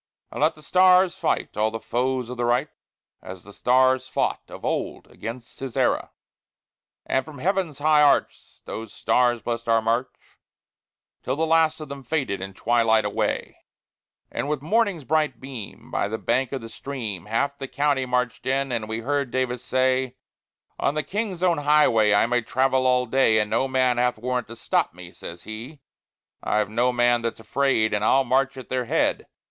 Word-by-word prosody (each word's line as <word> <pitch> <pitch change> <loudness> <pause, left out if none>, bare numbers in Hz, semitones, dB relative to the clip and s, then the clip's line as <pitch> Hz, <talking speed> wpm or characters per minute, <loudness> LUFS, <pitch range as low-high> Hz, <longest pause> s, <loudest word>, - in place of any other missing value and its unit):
And - - -6
let 155 +2 +3
thy 155 - -16
stars 185 +3 +4
fight 190 - -1
all 110 +1 +2
the 115 +1 -5
foes 125 +1 -2
of 125 - -6
the 120 - -1
Right 125 +5 +1 0.5
As 95 -1 -10
the 100 - -14
stars 130 +2 +3
fought - - -1
of - - -10
old - - -2
against 115 +2 -8
Sisera." 135 -3 -1 1.0
And 130 - 0
from 150 +1 -11
heaven's 180 -1 -1
high 150 +1 +4
arch 145 -1 +1
those 110 -1 -6
stars 120 -3 +1
blessed 115 -1 -3
our 115 0 +5
march, 115 +3 0 1.1
Till 130 - -2
the 160 +2 0
last 160 -1 +3
of 155 - -7
them 140 0 -7
faded 130 -8 -2
in 95 0 -7
twilight 115 0 +2
away; - - -2 0.7
And 145 - -3
with 150 -2 -2
morning's 200 -3 +1
bright 150 -3 0
beam, 130 -6 -9
by - - 0
the 110 +2 -3
bank 125 +4 0
of 135 -2 -4
the 115 - -9
stream, 110 -10 -6
Half 140 +6 -1
the 135 - -5
county 140 -2 0
marched 125 0 -1
in, 135 0 0
and 110 -3 -2
we 110 +1 -3
heard 140 +1 -1
Davis 125 -1 -2
say: 130 0 +1 0.6
"On 145 - 0
the 155 - 0
King's 200 -2 -3
own 175 -4 +3
highway 145 -8 +4
I 100 - +4
may 120 +1 +1
travel 130 +2 +1
all 125 0 +3
day, 125 -2 +3
And 105 -1 0
no 115 +4 +2
man 130 -2 +2
hath 125 -1 +1
warrant 125 +2 -2
to 115 - -9
stop 110 - 0
me," 90 -1 -11
says 85 -1 -10
he; 115 +7 -8 0.6
"I've 105 0 0
no 120 +3 +2
man 120 -1 +2
that's 115 -1 -3
afraid, 110 -1 +1
and 105 0 0
I'll 135 +5 +4
march 135 +2 +1
at 130 - -9
their 130 -1 -1
head." - - 0
130 Hz, 185 wpm, -24 LUFS, 115-140 Hz, 1.1 s, our